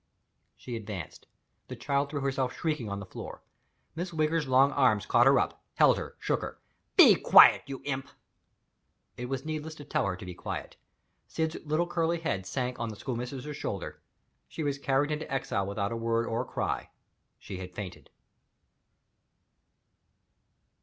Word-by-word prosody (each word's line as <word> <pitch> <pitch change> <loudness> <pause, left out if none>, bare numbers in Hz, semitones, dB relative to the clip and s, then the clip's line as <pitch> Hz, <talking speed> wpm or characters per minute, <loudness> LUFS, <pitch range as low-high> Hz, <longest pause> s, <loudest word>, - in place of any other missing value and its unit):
She 125 - -6
advanced. 105 -7 -7 0.4
The - - -6
child 140 0 0
threw 145 -1 -3
herself 135 -2 -1
shrieking 155 -10 -2
on 100 0 -3
the 100 - -7
floor. - - -9 0.5
Miss 175 +3 -3
Wigger's 155 -1 0
long 130 +2 +5
arms 125 -8 +3
caught 120 +1 +5
her 135 0 +6
up - - -2
held - - +5
her - - -7
shook - - -1
her. - - -6 0.4
"Be - - +10
quiet, - - +8
you 135 -1 -6
imp!" 135 -1 -3 1.1
It 125 0 -6
was 135 0 -3
needless 155 0 -4
to 145 - -10
tell 115 - 0
her 95 - -1
to 90 - -10
be 90 - -6
quiet. - - -6 0.5
Syd's 160 0 -2
little 155 +3 +1
curly 170 -1 0
head 95 - -2
sank 125 +4 -2
on 115 -1 -2
the 110 - -6
schoolmistress's 125 +5 -5
shoulder. 100 -8 -5 0.5
She 160 - -5
was 140 -1 -1
carried 140 +2 +1
into 150 0 -4
exile 100 -7 -1
without 100 0 -2
a - - -2
word 115 0 0
or 115 +1 -1
a - - -5
cry - - -3 0.5
she 95 - -8
had 90 -1 -8
fainted. 90 -8 -7
130 Hz, 165 wpm, -29 LUFS, 110-150 Hz, 1.1 s, Be